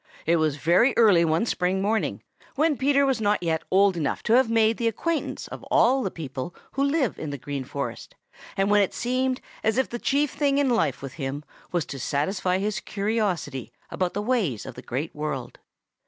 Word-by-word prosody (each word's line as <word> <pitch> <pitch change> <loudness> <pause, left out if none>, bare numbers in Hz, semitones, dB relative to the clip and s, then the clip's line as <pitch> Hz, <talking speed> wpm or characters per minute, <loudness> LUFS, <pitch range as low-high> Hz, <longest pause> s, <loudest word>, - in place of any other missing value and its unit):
It 170 +1 +3
was 155 -3 +1
very 175 - +3
early 205 -7 +6
one 165 +5 +2
spring 185 -3 0
morning, 215 +3 -1 0.3
when 305 +1 +2
Peter 280 +1 +3
was 265 -4 0
not 205 -2 +1
yet 160 -1 0
old 195 0 +4
enough 155 -4 -2
to 220 - +2
have 250 -1 +5
made 225 -1 +3
the 235 - 0
acquaintance 320 +8 -2
of - - -8
all 260 +4 +3
the 195 - -1
people 145 -1 -6 0.2
who 275 - 0
live 280 -4 +1
in 155 - -4
the 145 - -4
Green 140 +1 -5
Forest, 140 +2 -6 0.4
and 195 +1 +2
when 205 0 +5
it 195 - 0
seemed 255 +1 0 0.2
as 220 +2 +1
if 265 - +1
the 240 - -5
chief 285 +3 +1
thing 280 -1 +1
in 280 -3 +2
life 150 - 0
with 135 - -6
him 135 +2 -3 0.3
was 175 -3 0
to 135 - -7
satisfy 180 - 0
his 200 +1 -1
curiosity 195 - -2 0.2
about 180 -1 -2
the 205 - -1
ways 210 - 0
of - - -7
the - - -10
Great 140 +6 -4
World. 150 -4 -5
200 Hz, 200 wpm, -25 LUFS, 155-245 Hz, 0.4 s, early